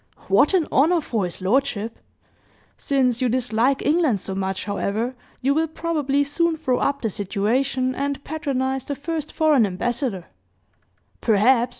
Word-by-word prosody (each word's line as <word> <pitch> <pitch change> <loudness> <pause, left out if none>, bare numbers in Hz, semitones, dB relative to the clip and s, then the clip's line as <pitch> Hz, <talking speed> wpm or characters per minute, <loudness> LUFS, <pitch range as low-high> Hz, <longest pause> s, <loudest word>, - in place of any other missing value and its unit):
"What - - +4
an 340 -5 +2
honor 335 +5 +4
for 225 - -2
his 180 +1 -5
lordship! 230 0 0 0.8
Since 260 -3 0
you 255 - +2
dislike 250 +2 +1
England 295 - +2
so 190 - -5
much, 190 0 -3
however, 215 +4 -2 0.3
you 275 +2 +2
will 320 +2 +1
probably 300 -4 0
soon 325 +3 0
throw 260 -5 0
up 280 -1 -1
the 225 - +1
situation 250 +7 0
and, 280 +1 -3
patronize 265 -3 -2
the 285 - -4
first 310 +1 -4
foreign 310 -6 +3
ambassador 205 - -2 0.5
" - - -42
"Perhaps! 235 +3 +3
260 Hz, 150 wpm, -23 LUFS, 225-290 Hz, 0.8 s, What